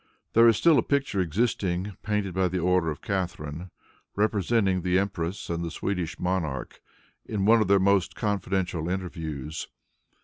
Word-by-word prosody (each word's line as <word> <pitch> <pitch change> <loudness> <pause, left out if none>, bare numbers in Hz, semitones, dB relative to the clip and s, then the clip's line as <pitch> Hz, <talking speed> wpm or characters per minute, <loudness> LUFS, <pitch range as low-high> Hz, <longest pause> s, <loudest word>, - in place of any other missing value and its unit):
There 115 +1 +7
is 115 -2 +5
still 165 -3 +5
a - - +4
picture 140 -8 0
existing, 95 0 -1
painted 105 -3 -1
by 95 0 +1
order 90 -1 +2
of 75 - -6
Catharine, 90 -3 -3 0.5
representing 100 -2 +1
the 90 +1 +2
empress 95 -2 -2
and 85 0 -2
the 85 - -3
Swedish 90 0 -3
monarch 85 -8 -2 0.4
in 100 -3 -2
one 115 +1 +6
of 105 - +1
their 100 +1 +5
most 95 -1 +2
confidential 95 -5 -1
interviews. 80 -5 -4
95 Hz, 145 wpm, -26 LUFS, 85-100 Hz, 0.5 s, There